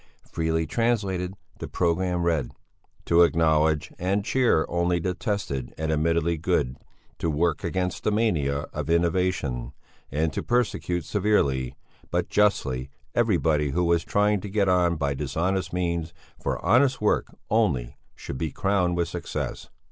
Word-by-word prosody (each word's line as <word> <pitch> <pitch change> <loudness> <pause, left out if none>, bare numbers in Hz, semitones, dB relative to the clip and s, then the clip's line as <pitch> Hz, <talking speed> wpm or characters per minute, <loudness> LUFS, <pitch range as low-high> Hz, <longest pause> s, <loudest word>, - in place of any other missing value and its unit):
Freely 80 0 0
translated 95 -2 0 0.2
the - - -5
programme 90 0 0
read: 80 -7 0 0.5
to 85 0 +5
acknowledge 80 -2 +3
and 100 +3 0
cheer 125 -11 +3
only 85 0 +1
the 90 +2 -1
tested 90 - -3
and 80 0 -1
admittedly 85 +2 +1
good, 65 -5 0 0.4
to 85 - 0
work 80 +1 0
against 90 -1 -2
the - - +2
mania 80 -11 +1
of 75 0 -4
innovation, 85 -7 0 0.4
and 80 +2 0
to - - -2
persecute 105 -8 0
severely, 70 -12 +1 0.3
but - - -1
justly, 70 -11 +1 0.2
everybody 80 -10 +2
who 90 +6 0
was 85 -1 +2
trying 105 -1 +2
to 105 - -6
get 100 0 +1
on 90 -2 +3
by 70 -3 -1
dishonest 80 +8 -1
means, 85 -2 -2 0.3
for - - -1
honest 130 +7 +4
work 105 - +1 0.2
only 70 - +1 0.2
should 65 - -7
be 80 - -1
crowned 90 -2 0
with 85 -1 +1
success. 85 -1 -5
85 Hz, 140 wpm, -25 LUFS, 75-95 Hz, 0.5 s, to